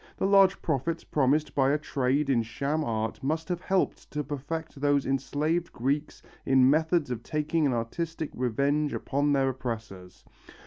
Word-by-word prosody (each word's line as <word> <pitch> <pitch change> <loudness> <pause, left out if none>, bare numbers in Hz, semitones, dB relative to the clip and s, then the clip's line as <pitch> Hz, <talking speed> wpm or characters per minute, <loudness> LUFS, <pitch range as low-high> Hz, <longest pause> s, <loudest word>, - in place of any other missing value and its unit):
The - - 0
large 195 -1 +5
profits 160 +2 -1
promised 145 +2 +1
by 135 -1 +3
a 145 - +3
trade 140 -1 0
in 130 -4 +3
sham 140 +7 -2
art 110 -4 -2
must 160 +5 -2
have 175 -1 -2
helped 190 0 -1
to 150 0 -3
perfect 145 +1 -5
those 145 -1 +2
enslaved 150 +5 -1
Greeks 140 +5 -2 0.2
in 130 -1 +5
methods 160 0 +2
of 120 -2 -3
taking 155 +3 0
an 130 - +1
artistic 155 +7 -3
revenge 140 +5 0
upon 145 +1 0
their 135 -1 +2
oppressors. 115 -8 -6
145 Hz, 160 wpm, -28 LUFS, 130-155 Hz, 0.2 s, large